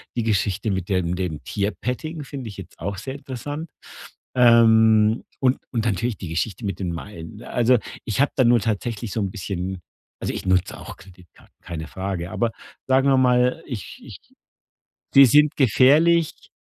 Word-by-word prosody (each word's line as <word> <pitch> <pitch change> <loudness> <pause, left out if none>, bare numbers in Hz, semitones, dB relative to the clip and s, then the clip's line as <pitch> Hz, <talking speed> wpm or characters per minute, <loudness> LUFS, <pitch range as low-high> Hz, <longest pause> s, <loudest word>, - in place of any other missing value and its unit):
Die 120 - 0
Geschichte 100 -1 0
mit 95 -2 -3
dem 90 -2 0
dem 90 -5 -4
Tierpetting 125 +9 -3
finde 135 -4 -7
ich 100 - -10
jetzt - - -11
auch 100 +4 -4
sehr 130 +7 -6
interessant. 145 +4 -6 0.7
Ähm, 110 -2 +5 0.2
und 130 0 +3 0.2
und 115 -1 -1
natürlich 115 +2 -1
die 90 - -7
Geschichte 95 +6 -3
mit 100 -1 -3
den 90 -3 -2
Meilen. 85 +2 -8
Ne, 115 - -11
also, 120 +1 +3 0.3
ich 110 +4 0
habe 145 - +2
da 130 - +3
nur 120 0 +5
tatsächlich 110 0 -3
so 110 - -2
'n 95 -2 -2
bisschen 95 -2 -5 0.4
Also, - - -2
ich - - -6
nutze 95 -1 +1
auch - - -9
Kreditkarten, 90 -3 -19
keine 80 -2 -7
Frage. 95 -2 -4
Aber, 120 -1 0 0.4
sagen 135 +1 +3
wir 135 - +4
mal, 125 +4 +3
ich 120 -8 -7
ich - - -11 1.0
Die 135 -1 +9
sind 150 +4 +4
gefährlich 150 +6 +3
110 Hz, 170 wpm, -23 LUFS, 95-130 Hz, 1.0 s, Die